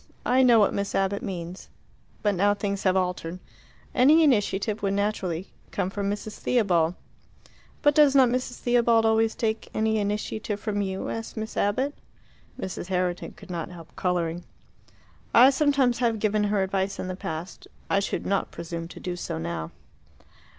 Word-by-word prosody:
I 255 +2 +4
know 245 -3 +6
what 205 - +3
Miss 200 0 -2
Abbott 195 +1 0
means. 180 -1 -6 0.5
But 205 -1 +3
now 200 +2 +3
things 200 -1 -2
have 185 0 +4
altered. 180 -2 -2 0.6
Any 295 +6 +6
initiative 210 -6 +1
would 200 -1 0
naturally 195 -4 -2 0.2
come 185 - -2
from 200 0 -2
Mrs. 210 +1 -5
Theobald." 180 -8 +2 0.9
"But 290 -1 +5
does 290 -2 +5
not 265 -2 +7
Mrs. 250 0 -2
Theobald 235 -2 +3
always 220 0 +3
take 220 -1 -2
any 220 0 +1
initiative 210 0 -2
from 205 -1 -2
you?" 190 -1 -3
asked 225 0 -5
Miss 220 0 -5
Abbott. 260 +8 +1 0.7
Mrs. 185 -4 -5
Herriton 180 -1 -1
could 195 -2 -12
not 170 -2 -4
help 170 -2 -12
colouring. 175 -2 -1 0.9
"I 255 +4 +9
sometimes 275 -4 +2
have 235 -3 +1
given 210 0 +1
her 205 -1 +1
advice 190 +1 -1
in - - -4
the 185 - -4
past. 180 -2 -6 0.2
I 200 - +2
should 200 - -3
not 195 0 0
presume 170 0 -6
to - - -11
do 180 -1 -4
so 175 - -4
now." 80 -1 -4
200 Hz, 165 wpm, -26 LUFS, 185-225 Hz, 0.9 s, I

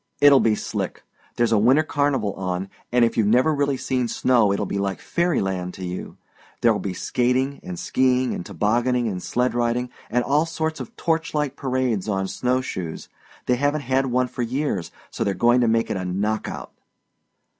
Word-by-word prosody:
It'll 145 -1 +7
be 110 -3 +3
slick. - - -4 0.3
There's 120 -1 +2
a 110 - +4
winter 130 +8 +5
carnival 140 - 0
on, 95 0 -3 0.2
and 120 -1 +5
if 115 - -2
you've 110 -3 +3
never 125 +8 +4
really 140 -2 0
seen 125 -1 -1
snow 115 -3 +3
it'll 100 +1 0
be 100 - -3
like 100 -1 -2
fairy 170 0 0
land 90 -2 -3
to 95 - -6
you. 90 +1 -6 0.4
There'll 115 -3 +3
be 95 -2 -4
skating 125 +7 0
and 90 -1 -7
skiing 130 +5 +1
and - - -4
tobogganing 120 +6 +1
and 95 -4 -3
sleigh 125 +6 0
riding, 120 +1 -1 0.2
and 125 +2 +1
all 150 +5 +2
sorts 160 -1 -2
of 130 - -8
torchlight 155 -4 -1
parades 130 -7 -1
on 95 -1 0
snow 125 +5 0
shoes. 90 -10 -6 0.4
They 125 - +2
haven't 145 +3 +1
had 135 0 +1
one 125 0 +1
for 125 - -6
years, 120 - -2 0.2
so - - -2
they're 100 -3 0
gong 120 +1 +4
to 120 - +3
make 115 0 +1
it - - -1
a 95 - -3
knock 100 +4 -1
out." - - -7
120 Hz, 190 wpm, -23 LUFS, 100-130 Hz, 0.4 s, It'll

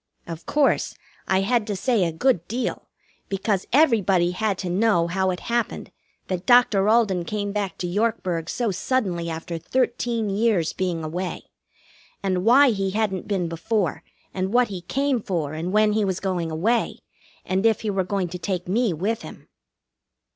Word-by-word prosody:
Of 165 -1 -8
course, 295 -1 +2 0.3
I 190 0 +2
had 230 +2 +1
to 205 - -2
say 230 0 +1
a 165 - -1
good 175 -1 +1
deal, 245 +4 -3 0.4
because 195 0 -1
everybody 205 - +3
had 200 +1 -1
to 185 - -4
know 195 -2 +3
how 190 +2 0
it 180 -1 -3
happened 235 -1 -2 0.4
that 185 -1 -4
Doctor 225 -5 +5
Alden 215 -6 +3
came 205 +2 -3
back 200 -2 -3
to 180 - -3
Yorkburg 185 -4 -1
so 235 -4 -1
suddenly 185 -4 -1
after 165 +1 -5
thirteen 235 +2 -1
years' 200 -5 +1
being 175 -3 -2
away. 175 +4 -4 0.8
And 185 -2 0
why 255 +5 +6
he 195 -3 -1
hadn't 205 -2 -1
been 190 -4 0
before, 170 +1 -1 0.3
and 190 0 -2
what 245 0 +3
he 190 -3 -5
came 270 +6 0
for 165 -7 -2
and 165 +3 -3
when 210 +1 +3
he 215 0 +1
was 190 -2 -1
going 180 -4 -2
away, 210 +10 0 0.5
and 190 +1 0
if 225 -2 +3
he 215 - -1
were 195 -1 0
going 185 -1 -2
to 180 +1 -6
take 180 -2 -3
me 215 +1 +1
with 205 +8 -2
him. - - -11
195 Hz, 170 wpm, -24 LUFS, 180-225 Hz, 0.8 s, why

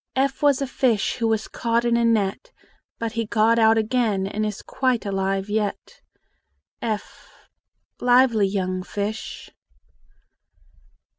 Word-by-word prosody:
F 270 +1 0
was 285 -2 +3
a - - 0
fish 250 -5 0
Who 230 - 0
was 220 -1 0
caught 235 0 -1
in 235 0 +2
a 235 - +2
net; 215 -4 0 0.5
But 230 -1 -3
he 230 -1 -3
got 225 +1 +3
out 225 0 +5
again, 220 -3 +1
And 210 +2 -3
is 210 -1 -6
quite 255 -4 -1
alive 195 0 -1
yet. 210 -1 -3 0.8
f 215 -3 -5 0.7
Lively 245 -4 +4
young 185 -2 -2
fish! 205 +3 -5
220 Hz, 130 wpm, -23 LUFS, 205-235 Hz, 0.8 s, out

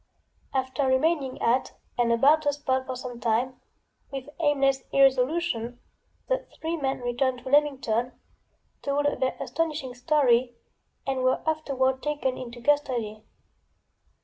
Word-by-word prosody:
After 265 +1 0
remaining 265 0 +1
at 245 +3 +2 0.2
and 240 -1 +2
about 280 +7 +5
the 290 -1 +2
spot 260 -2 -1
for 260 - -3
some 245 -1 -7
time, 240 +2 0 0.5
with 270 0 -6
aimless 275 -3 +2
irresolution, 260 -3 +2 0.5
the - - -1
three 325 +1 -2
men 270 -5 -2
returned 245 +1 -1
to - - -6
Leamington, 260 -5 +2 0.7
told 285 +1 0 0.2
their 260 - 0
astonishing 305 -6 -2
story 245 -2 +2 0.5
and 265 -1 -1
were 255 +4 +1
afterward 265 -4 0
taken 290 -3 -1
into 240 -1 -8
custody. 240 -6 0
260 Hz, 120 wpm, -27 LUFS, 245-290 Hz, 0.7 s, about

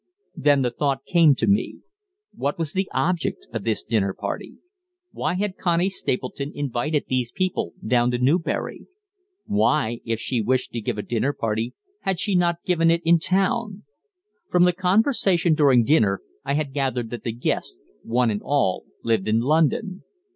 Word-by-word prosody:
Then 145 -2 +3
the 125 - 0
thought 135 +1 -1
came 165 -5 +5
to - - 0
me, 200 +1 0 0.5
What 140 +2 -2
was 160 -3 -2
the 190 0 -1
object 165 +5 -1
of 115 -4 -3
this 110 -2 -1
dinner 100 -4 0
party? - - -5 0.6
Why 160 +3 -2
had 195 0 -2
Connie 175 +1 +1
Stapleton 140 -3 -3
invited 145 +2 -1
these 125 -2 -1
people 185 -1 -2
down 120 -1 +3
to 125 - 0
Newbury? 145 +8 -1 0.6
Why, 150 - +1
if 115 -1 -2
she 120 0 -1
wished 130 +4 0
to 115 - -4
give 110 0 -3
a 105 - -3
dinner 120 +4 -1
party, 115 0 -2 0.2
had 190 -2 -2
she 205 -1 0
not 175 -1 +1
given 165 -2 +3
it 170 +1 +2
in 170 0 +5
town? 195 +4 0 0.7
From 180 0 +4
the 180 0 +4
conversation 185 - +2
during 140 -6 +4
dinner 110 -8 +2 0.2
I 140 0 -1
had 145 -3 -2
gathered 130 -5 -2
that 120 - -6
the 115 - -2
guests, 110 - -2 0.2
one 120 - +1
and 105 - -3
all, 135 -11 0 0.2
lived 110 -4 0
in 110 +1 +3
London. 165 - +1
145 Hz, 170 wpm, -23 LUFS, 120-175 Hz, 0.7 s, came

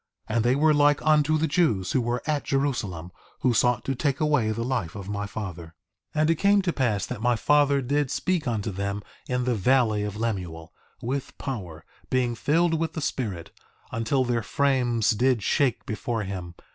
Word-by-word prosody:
And 110 +1 +1
they 120 +2 +3
were 155 +2 +4
like 145 0 +4
unto 155 0 +4
the 160 - +1
Jews 140 - +1
who 130 - +2
were 120 +1 -2
at 150 -2 0
Jerusalem, 105 - -2 0.3
who 125 - +3
sought 120 +1 +2
to 135 - 0
take 140 +1 -1
away 150 -8 +2
the 110 +2 -2
life 120 -10 -2
of 100 -2 -7
my 100 0 -3
father. 90 -6 -7 0.4
2:14 155 - +2
And 155 - +3
it - - +3
came 200 +2 +4
to 175 -3 0
pass 110 -8 0
that 125 -4 -6
my 120 +1 +3
father 145 +2 +3
did 145 +2 0
speak 180 -2 -1
unto 110 -3 -1
them 100 +1 -3 0.3
in 125 0 0
the 125 0 +1
valley 110 0 +2
of 105 0 -4
Lemuel, 90 -8 -4 0.3
with 135 +3 -3
power, 90 - -6 0.2
being 125 -2 +1
filled 165 +6 +1
with 160 -1 -2
the - - -4
Spirit, 110 - -3 0.4
until 115 +3 0
their 120 -1 0
frames 120 -2 +1
did 120 0 +2
shake 140 +1 +1
before 110 0 -3
him. 90 -3 -6
120 Hz, 190 wpm, -26 LUFS, 105-145 Hz, 0.4 s, were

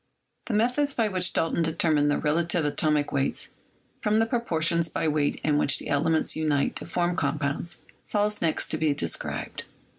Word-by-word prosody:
The 225 - -1
method 250 +6 +1
by 225 -3 +2
which 185 -2 +1
Dalton 165 +1 0
determined 155 -2 +2
the 145 - +1
relative 165 +2 +1
atomic 150 0 +1
weights 140 -1 -1 0.5
from 210 0 +1
the 225 - +3
proportions 170 -9 +1
by 160 - -2
weight 150 -1 +1
in 150 -1 +2
which 140 - +4
the - - -7
elements 155 +3 +2
unite 150 -3 0
to - - -4
form 175 +1 0
compounds, 145 +1 -2 0.2
falls 210 0 0
next 160 -2 0
to - - -1
be 155 -2 +1
described. 85 - -3
160 Hz, 170 wpm, -26 LUFS, 150-185 Hz, 0.5 s, which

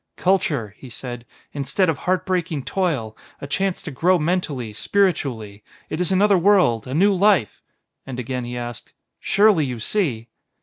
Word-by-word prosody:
"Culture," 150 - 0
he 130 - -11
said, 120 0 -8 0.3
"instead 140 +7 0
of 160 -4 0
heart 185 0 0
breaking 175 -6 -1
toil, 145 - -2 0.2
a - - -7
chance 190 +7 -1
to 165 - -6
grow 175 +7 +2
mentally, 150 -9 -2
spiritually; 115 - -1 0.3
it 155 - -2
is 180 - 0
another 195 0 +4
world, 175 - +3
a 130 - -4
new 200 +5 +4
life 190 - +2 0.2
" - - -57
And 130 -2 -6
again 125 0 -3
he 120 +1 -5
asked: 120 -1 -7 0.3
"Surely, 200 -5 +3
you 125 -4 -4
see?" 120 - -1
150 Hz, 165 wpm, -22 LUFS, 120-185 Hz, 0.3 s, another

